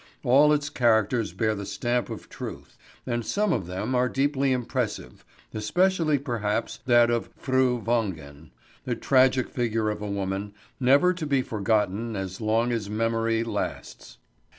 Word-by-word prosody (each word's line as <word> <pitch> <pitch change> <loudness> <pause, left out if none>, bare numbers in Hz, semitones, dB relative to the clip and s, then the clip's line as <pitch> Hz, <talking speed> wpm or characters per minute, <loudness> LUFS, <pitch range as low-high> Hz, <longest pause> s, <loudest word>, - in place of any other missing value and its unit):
All 140 +5 +5
its 145 -1 0
characters 115 -2 +2
bear 110 -2 0
the 100 -1 -5
stamp 120 +4 -2
of - - -7
truth, - - -8 0.3
and 120 -2 -2
some 210 - 0
of 95 -8 -2
them 95 +8 -3
are 125 0 +2
deeply 140 0 +1
impressive, 120 - -3 0.3
especially, 165 - +1
perhaps, 115 -5 -2
that 120 -1 +5
of 120 -1 -1
Fru 130 -2 +1
Wangen, 85 -11 -3 0.4
a - - 0
tragic 130 -1 +3
figure 115 -3 -1
of 105 - -6
a 105 - -4
woman, 100 +1 -3 0.2
never 140 +8 +4
to 165 -4 -5
be 135 -2 +2
forgotten 110 +1 -1
as 95 +1 -5
long 115 +3 +1
as 110 -4 -2
memory 115 +1 0
lasts. 115 - -5
115 Hz, 150 wpm, -26 LUFS, 105-130 Hz, 0.4 s, All